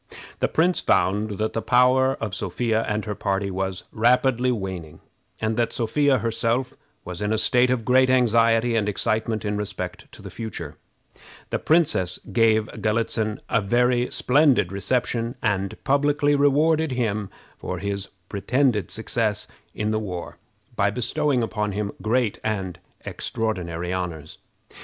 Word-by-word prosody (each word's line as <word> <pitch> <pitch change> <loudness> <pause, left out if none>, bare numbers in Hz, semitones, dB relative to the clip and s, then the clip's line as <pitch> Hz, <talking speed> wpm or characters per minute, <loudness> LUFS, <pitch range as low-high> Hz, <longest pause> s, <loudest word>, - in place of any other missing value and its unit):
The - - +2
prince 175 +3 +2
found 105 +1 +1
that 110 0 -1
the 115 - -1
power 130 +2 +4
of 110 -3 -5
Sophia 110 +3 -1
and 105 +1 -1
her 105 - -3
party 100 0 -1
was 95 0 -3
rapidly 125 +2 +3
waning, 95 -8 -5 0.4
and 110 0 -1
that 120 -1 +1
Sophia 135 +4 +2
herself 115 +2 -1 0.3
was 90 +1 -6
in 105 0 -1
a 110 - +2
state 125 +3 +3
of 125 -3 0
great 130 +1 +4
anxiety 115 -2 +3
and 105 -2 +1
excitement 110 +2 -1
in 105 0 -1
respect 100 -3 -5
to - - -13
the - - -8
future. 85 -10 -6 0.8
The - - 0
princess 150 - +2 0.2
gave 110 -2 +4 0.2
Galitzin 110 -1 0
a 115 - +1
very 120 +4 +2
splendid 135 - +3
reception, 120 +3 -1
and 100 -3 0
publicly 145 +1 +2
rewarded 150 +2 +3
him 105 -5 -1 0.3
for 90 - -4
his 100 +1 -3 0.2
pretended 110 - 0
success 110 -1 -1 0.3
in 105 0 -1
the 110 - 0
war 90 -5 -6 0.4
by 100 0 +2
bestowing 125 +4 0
upon 105 -2 -2
him 105 0 -2
great 115 0 0
and 95 -5 -3 0.3
extraordinary 90 -6 -3
honors. 85 -4 -5
110 Hz, 145 wpm, -24 LUFS, 100-125 Hz, 0.8 s, power